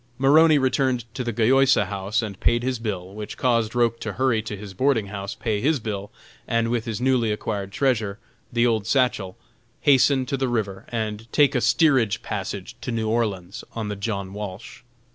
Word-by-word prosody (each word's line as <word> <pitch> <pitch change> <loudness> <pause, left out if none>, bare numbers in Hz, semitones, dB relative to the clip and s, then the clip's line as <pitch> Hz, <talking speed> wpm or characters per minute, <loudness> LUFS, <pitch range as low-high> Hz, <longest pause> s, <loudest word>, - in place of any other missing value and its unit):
Maroney 155 +4 +6
returned 130 -3 +1
to 125 - -3
the 120 - -2
Gayosa 130 +1 +4
House 100 +4 -2
and 100 -3 -6
paid 120 0 +2
his 130 -2 -1
bill, 95 -4 -4
which 105 0 -7
caused 115 -3 +1
Roch 115 -1 +2
to 110 - -4
hurry 130 -2 +1
to 105 -1 -6
his 100 -1 -9
boarding 115 -2 +1
house, 100 0 -5
pay 105 -3 -2
his 150 +1 +2
bill, 105 -3 -5 0.4
and 115 0 +1
with 120 -2 -1
his 110 -3 -3
newly 125 -3 +2
acquired 100 -2 -3
treasure, 110 -5 0 0.3
the 120 0 +2
old 110 -4 +1
satchel, 115 -7 +1 0.4
hasten 135 -1 +4
to 135 +1 -2
the 130 -1 0
river 105 -5 -2
and 110 -1 -4
take 145 -2 +4
a 125 - +1
steerage 130 - +3
passage 100 +2 -5
to 125 - -4
New 110 -1 -1
Orleans 105 -2 -2
on 110 -2 -3
the 105 - -3
John 100 -2 -4
Walsh. 105 0 -7
115 Hz, 185 wpm, -24 LUFS, 105-125 Hz, 0.4 s, Maroney